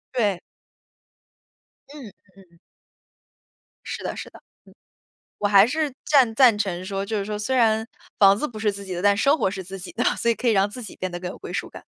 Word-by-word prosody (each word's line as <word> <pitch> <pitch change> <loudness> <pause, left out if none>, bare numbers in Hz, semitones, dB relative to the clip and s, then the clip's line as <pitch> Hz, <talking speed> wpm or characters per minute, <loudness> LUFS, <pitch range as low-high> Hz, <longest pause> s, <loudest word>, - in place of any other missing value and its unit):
对。 205 -7 +1 1.5
嗯， 280 -5 -10
嗯 - - -12 0.4
嗯。 170 - -24 1.3
是 - - -6
的 - - -4
是 - - -7
的， - - -16
嗯。 - - -37 1.0
我 205 - 0
还 200 0 +7
是 300 +3 -1
赞 260 -7 +4
赞 240 -4 +6
成 185 -3 -2
说， 195 0 -3
就 220 +2 -3
是 200 - -2
说 210 0 -4
虽 255 +5 -1
然 220 -2 +2 0.3
房 195 -1 +6
子 300 - -2
不 220 -5 -9
是 215 -1 +1
自 200 0 -8
己 190 - -7
的， 175 - -4
但 200 0 +4
生 280 +8 +3
活 215 - +1
是 190 -1 -6
自 190 +2 -8
己 185 - -8
的， 240 - -2
所 235 - +1
以 - - +2
可 245 - -5
以 230 - +4
让 200 0 +3
自 245 +4 -8
己 215 - -9
变 185 0 -4
得 175 - -5
更 180 0 -5
有 - - -10
归 - - -9
属 - - -3
感。 - - -11
210 Hz, 245 characters per minute, -23 LUFS, 195-235 Hz, 1.5 s, 还